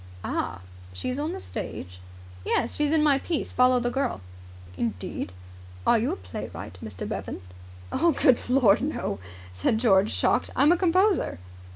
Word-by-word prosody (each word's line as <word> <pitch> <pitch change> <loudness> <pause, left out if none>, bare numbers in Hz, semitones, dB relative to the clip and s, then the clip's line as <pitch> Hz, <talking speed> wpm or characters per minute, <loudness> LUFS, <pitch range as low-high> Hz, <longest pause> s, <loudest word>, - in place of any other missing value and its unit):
"Ah! - - -2 0.3
She 90 - -3
is 255 - -3
on 305 +3 -1
the 380 - -5
stage?" 90 - -7 0.4
"Yes. 235 - 0
She's 295 -1 +1
in 315 -1 +3
my 285 -3 +4
piece, 325 +2 -2
'Follow 250 0 +4
the 240 0 -1
Girl'." 270 - -1 0.5
"Indeed! 100 -3 -3 0.5
Are 235 - +5
you 230 - 0
a - - -1
playwright, 90 -1 -8
Mr. 100 -4 -6
Bevan?" - - -5 0.5
"Good 275 -8 +3
Lord, 250 -6 +5
no!" 270 - -2 0.3
said 90 - +1
George, 205 -3 +4
shocked. - - +1
"I'm 295 +3 +5
a - - +6
composer." 370 - +2
250 Hz, 155 wpm, -26 LUFS, -, 0.5 s, a